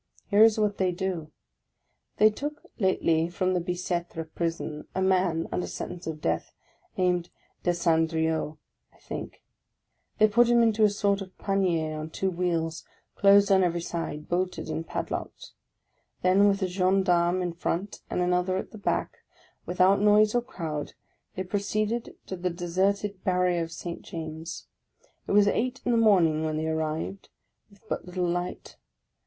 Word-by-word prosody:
Here 205 Hz, +2 st, +7 dB
is 225 Hz, -1 st, +5 dB
what 210 Hz, -1 st, 0 dB
they 185 Hz, -1 st, +2 dB
do. 175 Hz, -4 st, -3 dB, 0.9 s
They 215 Hz, +1 st, +6 dB
took 295 Hz, +7 st, -5 dB, 0.2 s
lately 170 Hz, -4 st, +2 dB
from 185 Hz, +1 st, 0 dB
the 180 Hz, -, +1 dB
Bicetre 175 Hz, -1 st, -3 dB
prison 160 Hz, -2 st, -4 dB
a 190 Hz, -, 0 dB
man, 185 Hz, -3 st, +2 dB
under 180 Hz, -, -2 dB
sentence 175 Hz, -1 st, -6 dB
of 160 Hz, -1 st, -4 dB
death, -, -, -2 dB, 0.4 s
named 180 Hz, -2 st, +1 dB, 0.3 s
Desandrieux, 160 Hz, -2 st, +1 dB, 0.3 s
I -, -, -25 dB
think; -, -, -8 dB, 0.7 s
they 215 Hz, -, +6 dB
put 235 Hz, +3 st, +4 dB
him 240 Hz, 0 st, +5 dB
into 220 Hz, -1 st, +3 dB
a 210 Hz, -, +6 dB
sort 200 Hz, -1 st, 0 dB
of 190 Hz, -1 st, -9 dB
panier 170 Hz, -6 st, 0 dB
on 155 Hz, +1 st, -5 dB
two 190 Hz, +4 st, -1 dB
wheels, 170 Hz, -2 st, -1 dB, 0.3 s
closed 200 Hz, 0 st, +5 dB
on 190 Hz, -1 st, +5 dB
every 170 Hz, -1 st, 0 dB
side, 165 Hz, -3 st, -4 dB
bolted 180 Hz, -2 st, -2 dB
and 165 Hz, +1 st, -4 dB
pad -, -, -4 dB
locked; -, -, -6 dB, 0.7 s
then 190 Hz, +3 st, +5 dB
with 195 Hz, -1 st, +1 dB
a -, -, +1 dB
gendarme 185 Hz, -1 st, +2 dB
in 175 Hz, -1 st, -2 dB
front, 180 Hz, +3 st, -3 dB
and -, -, -1 dB
another 180 Hz, +1 st, +1 dB
at -, -, -5 dB
the 215 Hz, -, -10 dB
back, -, -, -1 dB, 0.5 s
without 185 Hz, +2 st, +3 dB
noise 210 Hz, 0 st, +5 dB
or 245 Hz, -, +2 dB
crowd, 160 Hz, -10 st, -5 dB, 0.4 s
they 185 Hz, -, -2 dB
proceeded 215 Hz, +4 st, -2 dB
to 190 Hz, -, -5 dB
the 180 Hz, 0 st, -2 dB
deserted 190 Hz, +3 st, -1 dB
barrier 180 Hz, -2 st, +2 dB
of 165 Hz, 0 st, -4 dB
St. 170 Hz, +1 st, -6 dB
James. 160 Hz, 0 st, -7 dB, 0.6 s
It -, -, -3 dB
was 205 Hz, 0 st, +6 dB
eight 250 Hz, +5 st, 0 dB
in 245 Hz, -, +2 dB
the 235 Hz, -, +3 dB
morning 170 Hz, -8 st, +4 dB
when 155 Hz, -1 st, -1 dB
they 155 Hz, -, -1 dB
arrived, 160 Hz, +4 st, -3 dB, 0.4 s
with 205 Hz, +2 st, -23 dB
but -, -, -4 dB
little 180 Hz, 0 st, -2 dB
light. 175 Hz, +1 st, -3 dB
180 Hz, 160 wpm, -27 LUFS, 165-200 Hz, 0.9 s, Here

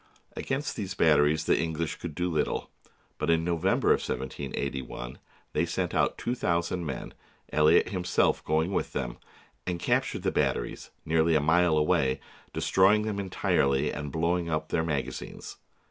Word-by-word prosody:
Against 140 Hz, +2 st, -2 dB
these 95 Hz, -4 st, -4 dB
batteries 80 Hz, 0 st, +4 dB
the -, -, +3 dB
English 80 Hz, 0 st, -2 dB
could 80 Hz, -4 st, -7 dB
do 90 Hz, +2 st, 0 dB
little; 80 Hz, -4 st, -1 dB, 0.5 s
but 75 Hz, -, -1 dB
in 80 Hz, 0 st, +3 dB
November 85 Hz, +2 st, +1 dB
of -, -, +5 dB
1781 65 Hz, -2 st, -4 dB, 0.3 s
they 75 Hz, -, +2 dB
sent 85 Hz, +1 st, -2 dB
out -, -, +1 dB
two 120 Hz, -, -2 dB
thousand 85 Hz, -5 st, -1 dB
men, 65 Hz, -, -5 dB, 0.4 s
Elliot 75 Hz, +3 st, +5 dB
him 90 Hz, -3 st, -3 dB
self 90 Hz, -, +2 dB
going 80 Hz, +5 st, +1 dB
with -, -, -1 dB
them, 60 Hz, -3 st, -3 dB, 0.5 s
and 90 Hz, -1 st, -1 dB
captured -, -, 0 dB
the -, -, +1 dB
batteries, -, -, -1 dB, 0.2 s
nearly 80 Hz, +1 st, +3 dB
a -, -, +5 dB
mile 80 Hz, +2 st, +3 dB
away, 65 Hz, -3 st, +2 dB, 0.3 s
destroying 100 Hz, +3 st, +3 dB
them 105 Hz, -2 st, -2 dB
entirely 70 Hz, -8 st, +1 dB
and 75 Hz, -1 st, -5 dB
blowing 85 Hz, +1 st, 0 dB
up 80 Hz, -1 st, -2 dB
their 80 Hz, -, +1 dB
magazines. 75 Hz, -4 st, -4 dB
80 Hz, 155 wpm, -28 LUFS, 75-90 Hz, 0.5 s, of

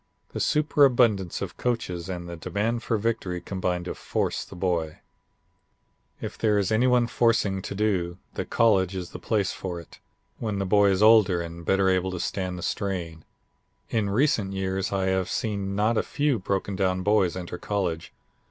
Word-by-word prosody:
The -, -, -3 dB
superabundance 125 Hz, -, +3 dB
of -, -, -7 dB
coaches 95 Hz, -8 st, -2 dB
and 90 Hz, -2 st, -5 dB
the 85 Hz, -, -6 dB
demand 100 Hz, +8 st, -2 dB
for 115 Hz, -1 st, 0 dB
victory 100 Hz, -5 st, -2 dB
combine 90 Hz, -1 st, -2 dB
to 90 Hz, -, -4 dB
force -, -, -2 dB
the -, -, -12 dB
boy. 85 Hz, -4 st, -1 dB, 1.2 s
"If -, -, -7 dB
there 105 Hz, -2 st, +3 dB
is 100 Hz, -1 st, 0 dB
any 115 Hz, +4 st, +3 dB, 0.2 s
forcing 115 Hz, -5 st, +1 dB
to 100 Hz, -, -6 dB
do, 95 Hz, -4 st, 0 dB, 0.2 s
the -, -, -2 dB
college 95 Hz, -5 st, +2 dB
is 90 Hz, -2 st, -5 dB
the -, -, -8 dB
place 105 Hz, -4 st, 0 dB
for 90 Hz, -2 st, -5 dB
it, 85 Hz, -, -14 dB, 0.4 s
when 110 Hz, -3 st, -2 dB
the 100 Hz, -, -1 dB
boy 100 Hz, +1 st, +4 dB
is 95 Hz, +1 st, +2 dB
older 105 Hz, -5 st, +6 dB
and 85 Hz, 0 st, -6 dB
better 95 Hz, +2 st, +2 dB
able 95 Hz, 0 st, +2 dB
to 90 Hz, -1 st, -4 dB
stand 90 Hz, -1 st, -3 dB
the 90 Hz, -, -6 dB
strain. 85 Hz, -5 st, -3 dB, 0.7 s
In 110 Hz, -3 st, +1 dB
recent 105 Hz, -3 st, +1 dB
years 95 Hz, 0 st, -2 dB
I 95 Hz, -1 st, 0 dB
have 95 Hz, -1 st, 0 dB
seen 100 Hz, -3 st, -2 dB
not 110 Hz, +3 st, +2 dB
a -, -, +3 dB
few 145 Hz, -5 st, 0 dB
brokendown 95 Hz, -1 st, -1 dB
boys 95 Hz, -4 st, +2 dB
enter 90 Hz, -1 st, -6 dB
college. 90 Hz, -6 st, -2 dB
95 Hz, 170 wpm, -26 LUFS, 90-110 Hz, 1.2 s, older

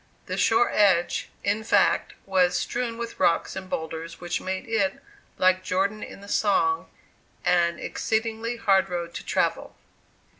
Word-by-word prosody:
The -, -, -3 dB
shore 400 Hz, +1 st, +3 dB
edge 185 Hz, -4 st, +3 dB
in 210 Hz, +2 st, 0 dB
fact -, -, +2 dB
was 180 Hz, -2 st, +2 dB
strewn 240 Hz, -2 st, -2 dB
with 230 Hz, 0 st, -6 dB
rocks 165 Hz, -, +2 dB
and 190 Hz, -1 st, -7 dB
boulders, 160 Hz, 0 st, -5 dB
which 175 Hz, 0 st, -3 dB
made 190 Hz, 0 st, -4 dB
it, 200 Hz, -4 st, 0 dB, 0.4 s
like 185 Hz, 0 st, +3 dB
"Jordan" 195 Hz, +3 st, 0 dB
in -, -, -9 dB
the 200 Hz, -, -12 dB
song, 220 Hz, -, +1 dB, 0.6 s
an 170 Hz, -1 st, +3 dB
exceedingly 225 Hz, +1 st, -2 dB
"hard 195 Hz, -4 st, +3 dB
road 170 Hz, -1 st, -4 dB
to -, -, -6 dB
travel." -, -, -1 dB
195 Hz, 145 wpm, -25 LUFS, 180-220 Hz, 0.6 s, shore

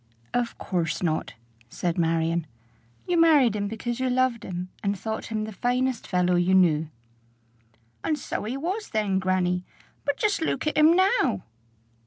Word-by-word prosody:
"Of 240 Hz, -1 st, -1 dB
course 170 Hz, -2 st, -2 dB
not," 160 Hz, -2 st, -1 dB, 0.3 s
said 170 Hz, +6 st, -2 dB
Marion. 165 Hz, 0 st, +1 dB, 0.6 s
"You 350 Hz, -2 st, +3 dB
married 290 Hz, -9 st, +5 dB
him 205 Hz, -1 st, -1 dB
because 230 Hz, +3 st, -4 dB
you 260 Hz, 0 st, 0 dB
loved 250 Hz, -2 st, +1 dB
him, 180 Hz, 0 st, -5 dB
and 200 Hz, 0 st, -1 dB
thought 220 Hz, +3 st, -4 dB
him 215 Hz, -1 st, -2 dB
the 220 Hz, -, -5 dB
finest 245 Hz, +3 st, -1 dB
fellow 180 Hz, -1 st, +2 dB
you 175 Hz, +2 st, +3 dB
knew." 160 Hz, -4 st, +3 dB, 1.1 s
"And 310 Hz, -, 0 dB
so 260 Hz, -, -4 dB
he 245 Hz, +5 st, -3 dB
was 375 Hz, +9 st, -3 dB
then, 205 Hz, -3 st, 0 dB
grannie. 185 Hz, -1 st, 0 dB, 0.4 s
But 285 Hz, -, -1 dB
just 420 Hz, -5 st, +1 dB
look 315 Hz, -4 st, -1 dB
at 305 Hz, -, 0 dB
him 310 Hz, +2 st, +6 dB
now!" 370 Hz, -, +2 dB
215 Hz, 160 wpm, -26 LUFS, 180-260 Hz, 1.1 s, him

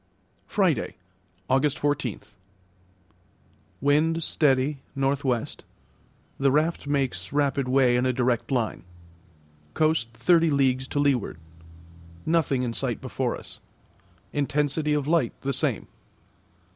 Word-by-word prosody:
Friday, -, -, +1 dB, 0.5 s
August 135 Hz, +2 st, +2 dB
14. 145 Hz, -6 st, -1 dB, 1.6 s
Wind 155 Hz, +4 st, +2 dB
steady, 140 Hz, -2 st, +2 dB, 0.2 s
N.W. 135 Hz, -3 st, +1 dB, 0.9 s
The 135 Hz, -1 st, +3 dB
raft 155 Hz, +2 st, 0 dB
makes 130 Hz, -11 st, -1 dB
rapid 140 Hz, -2 st, +1 dB
way 130 Hz, -1 st, +4 dB
in 125 Hz, +1 st, +2 dB
a -, -, +3 dB
direct 125 Hz, -1 st, 0 dB
line. 120 Hz, -5 st, -1 dB, 0.9 s
Coast 155 Hz, -6 st, +2 dB
thirty 165 Hz, +8 st, +4 dB
leagues 130 Hz, -2 st, +1 dB
to 145 Hz, -, -2 dB
leeward. 135 Hz, -, +1 dB, 0.9 s
Nothing 155 Hz, -6 st, +1 dB
in 120 Hz, -2 st, -2 dB
sight -, -, -2 dB
before -, -, -2 dB
us. -, -, -9 dB, 0.7 s
Intensity 150 Hz, +1 st, 0 dB
of 145 Hz, -2 st, 0 dB
light 160 Hz, -7 st, +1 dB
the 140 Hz, 0 st, -1 dB
same. -, -, -1 dB
140 Hz, 105 wpm, -25 LUFS, 130-150 Hz, 1.6 s, way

